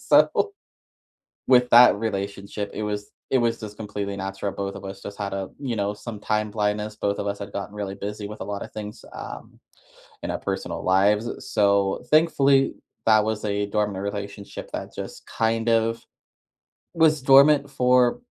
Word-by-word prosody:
So 425 - +3 1.0
with 125 -1 +5
that 120 +1 +9
relationship, 100 -1 -3
it 110 - -4
was 105 -1 -4 0.2
it 130 - +4
was 115 -1 +1
just 105 -2 -8
completely 105 -2 -4
natural. 95 +1 -3
Both 100 0 -4
of - - -8
us 95 0 -8
just 100 - -8
had 100 -1 -3
a, 95 -1 -3
you 130 -5 -3
know, 100 -1 -1
some 110 0 -8
time 105 0 -1
blindness. 105 0 -1
Both 100 -1 -1
of 100 - -2
us 100 0 -3
had 100 0 -7
gotten 100 +1 -5
really 100 -2 -4
busy 105 +1 -5
with 105 +1 -9
a - - -1
lot 100 -1 -4
of - - -10
things, 105 -1 -8
um, - - -9 0.6
in - - -3
our - - -2
personal - - -4
lives. 105 +4 +3 0.2
So, 100 0 +2
thankfully, 140 -4 +4 0.3
that 110 -1 +5
was 110 -1 -2
a 100 0 0
dormant 105 -2 -1
relationship 100 0 -6
that - - -5
just - - -8
kind 115 0 0
of 115 0 +2 0.9
was 155 -3 +4
dormant 140 +1 +6
for, 125 -2 +3
105 Hz, 175 wpm, -24 LUFS, 100-115 Hz, 1.0 s, that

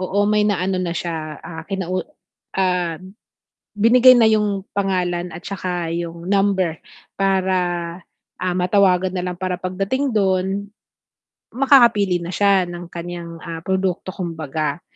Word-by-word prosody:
Oo 185 +2 -2
may 210 0 +3
naano 190 -2 0
na 175 - -2
siya, 160 -3 -4
ah, 165 -1 -8
kinau 185 -2 -2 0.5
ah, 180 -3 0 0.8
binigay 245 +4 +7
na 225 -2 +6
yung 205 -3 0
pangalan 180 -3 -1
at 165 - -8
saka 180 -4 -3
yung 170 0 -5
number 195 -5 +2 0.4
para, 190 -1 +2 0.8
ah, 180 -1 -2
matawagan 185 0 +3
na 180 - -2
lang 175 - -8
para 185 -1 -1
pagdating 195 +10 -2
do'n, 195 -1 0 0.8
makakapili 235 -9 +4
na 170 - -6
siya 200 -1 +3
ng 175 0 -7
kanyang, 170 -1 -7
ah, 165 -1 -6
produkto 190 0 -1
kumbaga. 160 -3 -3
185 Hz, 130 wpm, -21 LUFS, 175-200 Hz, 0.8 s, binigay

